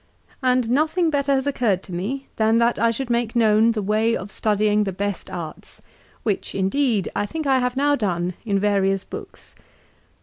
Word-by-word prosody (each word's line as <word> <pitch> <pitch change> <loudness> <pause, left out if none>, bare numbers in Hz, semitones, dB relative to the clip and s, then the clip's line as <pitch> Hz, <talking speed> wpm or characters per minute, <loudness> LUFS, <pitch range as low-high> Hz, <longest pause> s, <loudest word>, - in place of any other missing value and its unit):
And 250 -2 +2
nothing 315 +5 +2
better 280 -1 0
has 265 -1 +1
occurred 235 -9 0
to 185 - -10
me 240 +11 -3
than 220 +1 +3
that 235 +1 +2
I 230 - +3
should 240 +2 -3
make 235 0 0
known 220 -1 +4
the 215 -2 -2
way 215 +3 +1
of 200 - -8
studying 210 0 +1
the 195 - -2
best 200 +1 -4
arts, 165 -4 -8 0.4
which 210 -4 -2
indeed 205 +2 +1
I 205 0 0
think 315 +6 -4
I 265 -2 +3
have 250 +1 -1
now 290 +1 +3
done 180 -7 -1
in 205 -4 0
various 195 -1 +1
books." - - -9
225 Hz, 180 wpm, -22 LUFS, 200-260 Hz, 0.4 s, known